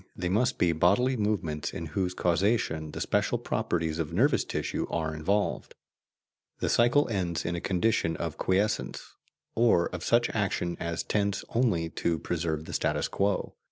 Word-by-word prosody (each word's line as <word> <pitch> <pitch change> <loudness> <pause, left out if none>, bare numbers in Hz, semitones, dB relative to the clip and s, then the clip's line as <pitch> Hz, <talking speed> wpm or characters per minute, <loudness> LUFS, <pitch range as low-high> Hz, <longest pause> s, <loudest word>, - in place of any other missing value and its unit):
they 90 -1 -2
must 125 +7 +1
be 85 - +3
bodily 100 +11 +3
movements 100 -9 -1
in 85 - -5
whose 90 0 -1
causation 85 -3 +1
the - - -7
special - - +1
properties 80 -1 -1
of 80 -1 -2
nervous 125 - +3
tissue - - -3
are 80 -1 -2
involved. 100 +7 -1 0.8
The - - -1
cycle 120 +5 +4
ends 90 -6 -1
in 85 - -1
a 85 - -4
condition 95 -3 +1
of - - -3
quiescence, 100 +3 -1 0.4
or 115 -7 +3
of 90 -1 -6
such 120 0 +3
action 95 -5 -1
as 85 -1 -2
tends 100 -1 -1
only 110 -9 +1
to 85 -1 0
preserve 80 -2 -2
the - - -8
status - - 0
quo. 100 -1 -1
90 Hz, 160 wpm, -28 LUFS, 85-105 Hz, 0.8 s, cycle